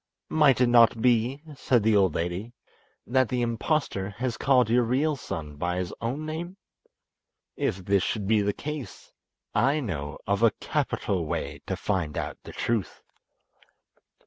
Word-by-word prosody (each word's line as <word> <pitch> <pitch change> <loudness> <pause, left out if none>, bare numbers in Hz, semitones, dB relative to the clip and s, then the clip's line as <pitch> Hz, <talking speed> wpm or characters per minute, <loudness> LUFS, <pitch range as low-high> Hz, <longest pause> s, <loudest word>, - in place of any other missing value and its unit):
"Might 150 -5 +4
it - - +6
not 115 -1 +5
be," 125 +4 +2
said 125 -4 +2
the 110 0 +4
old 95 -2 +3
lady, 90 +8 -3 0.5
"that 130 -1 +2
the 125 -1 0
impostor 115 -4 -1
has 120 +3 -3
called 130 -3 +3
your 120 +2 +3
real 140 +6 +1
son 75 - -6
by 90 +3 -1
his 90 -1 -3
own 130 +7 -3
name? 170 +4 -5 1.0
If 95 -1 -2
this 100 0 +3
should 105 +1 -2
be 105 +1 +3
the 100 0 +1
case, 150 +4 -7 0.4
I 140 +4 +3
know 80 - -4
of 100 +1 0
a 115 -2 +5
capital - - -1
way - - -4
to - - -1
find 80 -5 -2
out - - -4
the - - -9
truth." 115 -5 -2
115 Hz, 155 wpm, -27 LUFS, 100-130 Hz, 1.0 s, it